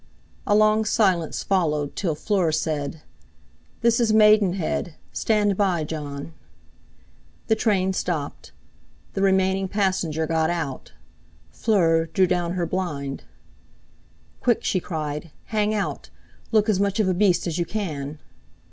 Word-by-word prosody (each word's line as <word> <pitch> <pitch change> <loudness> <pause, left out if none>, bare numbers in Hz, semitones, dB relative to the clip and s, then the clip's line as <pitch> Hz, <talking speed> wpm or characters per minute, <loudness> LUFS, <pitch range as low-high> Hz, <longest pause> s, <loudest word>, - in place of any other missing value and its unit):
A 205 - +4
long 215 +1 +4
silence 190 -7 +1
followed 150 -7 0
till 170 -6 -1
Fleur 180 0 +1
said: 155 -1 -2 0.8
"This 235 0 +3
is 230 -2 +2
Maidenhead; 200 -6 +3 0.2
stand 210 -2 +1
by, 185 -5 +1
Jon!" 150 0 -6 1.1
The 220 - +2
train 190 -4 +1
stopped. 160 -6 -3 0.6
The 195 - -2
remaining 190 0 +2
passenger 185 -6 0
got 160 0 +1
out. 160 -7 -4 0.6
Fleur 165 -7 +2
drew 185 +3 +2
down 175 -1 0
her 180 -2 -1
blind. 150 -6 -4 1.2
"Quick!" 240 -3 +2
she 185 - +1
cried. 155 -2 -4 0.2
"Hang 210 0 +2
out! 210 -2 -3 0.4
Look 215 -1 +3
as 210 -4 +2
much 200 +1 0
of 210 - +3
a 185 - +2
beast 185 -1 +2
as 170 -1 -2
you 170 - +1
can." 155 -8 -4
185 Hz, 130 wpm, -24 LUFS, 160-205 Hz, 1.2 s, A